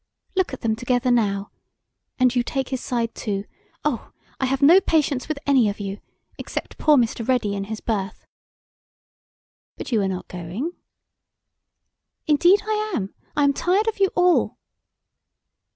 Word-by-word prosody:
Look 375 -4 +1
at 265 - -7
them 220 -1 +1
together 245 +1 0
now! 200 -4 +1 0.7
And 255 -1 +3
you 245 - +3
take 265 +2 -3
his 260 -2 -3
side, 230 -2 -2
too; 200 -2 -3 0.4
oh! 275 -7 -2 0.3
I 265 - +1
have 270 +2 0
no 345 +7 +8
patience 290 -7 +1
with 310 -1 -2
any 265 -6 +4
of 200 - -5
you 200 0 -5 0.4
except - - -6
poor 305 -2 +5
Mr. 230 -1 0
Ready 245 -6 +1
in 195 0 -3
his 215 +1 -6
berth." 205 -3 -3 1.5
"But - - -7
you 225 -3 +3
are 195 - +1
not 185 -1 -4
going." 180 - -5 1.5
"Indeed 345 +7 +4
I 430 0 -1
am. 195 -6 -3 0.2
I 290 - +4
am 280 0 +4
tired 380 +9 +1
of 445 - -1
you 390 - +5
all." 360 -1 +3
250 Hz, 155 wpm, -23 LUFS, 215-300 Hz, 1.5 s, no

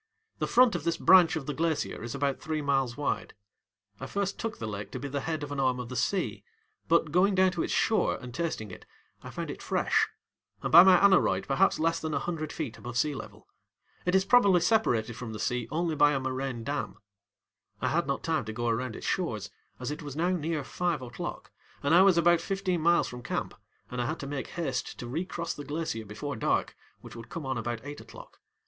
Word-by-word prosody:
The - - 0
front 250 -2 +5
of 175 - -3
this 170 0 0
branch 180 -2 +6
of 155 -4 -4
the 150 - -3
glacier 160 -1 -1
is 120 +3 -5
about 140 -1 -1
three 155 -1 -3
miles 135 -3 0
wide. 145 - -2 0.6
I 135 - -6
first 200 +2 -2
took 225 -1 -3
the 115 - -5
lake 105 -1 -5
to 130 - -4
be 140 - -4
the 140 +1 -2
head 155 +1 -3
of 145 - -6
an 140 - -3
arm 130 -2 +1
of 125 -1 -6
the 125 - -6
sea, 190 +8 -1 0.4
but, 165 -2 +3
going 190 +4 +3
down 185 0 +4
to 175 -2 -2
its - - -2
shore 220 - +2
and 125 -2 -9
tasting 140 - -3
it, - - -12 0.3
I - - -9
found - - -5
it - - -9
fresh, - - +1 0.6
and - - -2
by 170 - +11
my 185 0 +7
aneroid 175 - +4
perhaps 180 +8 +3
less 165 +1 +1
than 160 -2 -3
a - - +1
hundred 155 -2 -4
feet 140 -8 -5
above 120 0 -6
sea 150 +3 +2
level. - - -10 0.6
It 180 +1 +1
is 190 0 +4
probably 200 -8 +5
separated 125 - +2
from 115 -3 -6
the 105 - -6
sea 125 0 -1
only 165 +1 -1
by 145 -1 +4
a 135 - 0
moraine 130 -2 -3
dam. 145 +4 -3 0.8
I - - 0
had - - 0
not - - -2
time - - 0
to 110 - -5
go 120 +1 -1
around 115 0 -1
its - - -8
shores, 110 - -2 0.3
as 125 +2 -3
it 150 - -5
was 145 -3 -7
now 170 +3 +1
near 160 -3 -1
five 170 +1 -2
oŌĆÖclock 120 -2 -6 0.4
and 145 +3 +2
I 175 - +8
was 190 -2 +5
about 170 0 +4
fifteen 190 -3 -1
miles 170 +2 +4
from 125 0 -8
camp, 120 - -3 0.4
and 125 0 -2
I 120 - -1
had 155 - -2
to - - -5
make 140 -1 -4
haste 135 -7 -3
to 120 - -6
recross 170 +5 -3
the 145 - -8
glacier 145 -6 -3
before 110 +8 -5
dark, 110 - 0 0.3
which - - -11
would 115 -1 -10
come 165 -4 -6
on 130 -2 -2
about 120 0 -3
eight 145 +1 -7
oŌĆÖclock. - - -13
145 Hz, 230 wpm, -29 LUFS, 125-170 Hz, 0.8 s, by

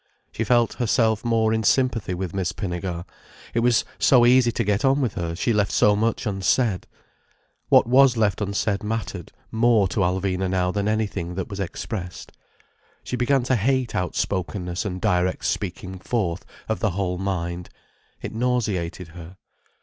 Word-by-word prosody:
She 115 - -2
felt 120 0 +2
herself 110 -2 +1
more 115 -2 +2
in 110 - +1
sympathy 115 -3 +1
with 90 -2 -4
Miss 95 -3 -2
Pinnegar—it 90 +3 -6
was 120 -1 +3
so 125 -3 +5
easy 125 -1 +5
to 115 - -1
get 105 0 0
on 135 +1 +3
with 125 -7 0
her, 85 -1 -3
she 115 +6 0
left 105 -2 +1
so 105 - +4
much 115 +3 0
unsaid. 100 0 0 0.8
What - - +6
was 130 0 +5
left 105 -2 +1
unsaid 100 0 -1
mattered 105 -5 -4 0.2
more 110 -3 +3
to 110 - -2
Alvina 95 0 0
now 90 -1 +1
than 100 +1 -1
anything 105 -5 -2
that 95 - -4
was 100 - -6
expressed. 95 0 -5 0.7
She - - -4
began 125 +2 +2
to 130 +1 +1
hate 125 +2 0
outspokenness 90 0 -2
and 90 -2 -3
direct 90 -3 0
speaking 95 -1 -3
forth 95 -4 -2 0.2
of 110 - -1
the 110 - +1
whole 90 -2 -1
mind. 90 -2 -3 0.5
It - - -5
nauseated 105 -8 -1
her. 85 +2 -11
100 Hz, 155 wpm, -23 LUFS, 90-115 Hz, 0.8 s, What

